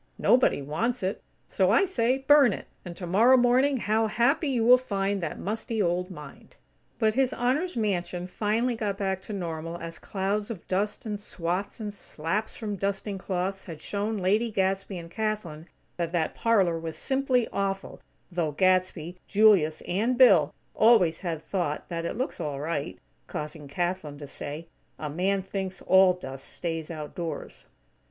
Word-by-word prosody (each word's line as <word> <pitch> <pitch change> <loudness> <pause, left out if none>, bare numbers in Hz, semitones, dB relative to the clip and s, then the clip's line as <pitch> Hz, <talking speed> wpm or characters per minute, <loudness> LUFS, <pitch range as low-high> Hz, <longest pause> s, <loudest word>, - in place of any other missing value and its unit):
Nobody 245 - +3
wants 220 - -1
it. 190 +2 -2 0.3
So 185 -1 +2
I 230 - +5
say, 255 -8 +1
burn 270 -4 +5
it, - - -7 0.2
and 175 -2 -8
tomorrow 210 +9 +4
morning, 255 +3 +4
how 220 -1 +1
happy 240 +8 +2
you 240 -4 +1
will 250 +1 +8
find 200 -4 -1
that 165 -3 -3
musty 220 +2 -3
old 180 -1 +1
mind!" 150 -6 -11 0.4
But 220 -2 +2
His 265 +1 +2
Honor's 265 +7 0
mansion 180 -4 -1
finally 220 +6 0
got 205 -3 -2
back 190 -2 -1
to 190 - -9
normal 165 -3 -4
as 165 -1 -8
clouds 205 +2 -2
of 210 -7 -7
dust 205 +4 -1
and 210 -2 -3
swats 180 +1 -3
and 210 -2 -4
slaps 195 +2 -3
from 210 -3 -4
dusting 195 0 -2
cloths 190 +1 -3
had 165 -4 -8
shown 210 +2 -2
Lady 205 +5 +2
Gadsby 195 -1 -1
and 170 -1 -9
Kathlyn 190 -7 -3 0.3
that 170 -2 -2
"that 165 -2 0
parlor 195 -8 +2
was 165 -1 -5
simply 265 -3 +1
awful" 195 0 -3 0.3
though 170 -4 -1
Gadsby, 185 0 +1
Julius 200 -7 +4
and 225 +7 0
Bill 195 - +6 0.2
always 215 -8 +5
had 165 -4 -4
thought 170 -6 -2
that 170 -1 -3
"It 170 - -3
looks 260 +3 -3
all 145 -2 -3
right," 150 0 -3 0.3
causing 150 -1 -6
Kathlyn 175 -1 -3
to 145 - -8
say: 145 +3 -6 0.3
"A 150 -2 -5
man 190 +4 0
thinks 190 -1 -4
all 190 -1 +6
dust 135 -6 -8
stays 165 -2 -4
outdoors." 165 +1 -6
195 Hz, 160 wpm, -27 LUFS, 170-220 Hz, 0.4 s, will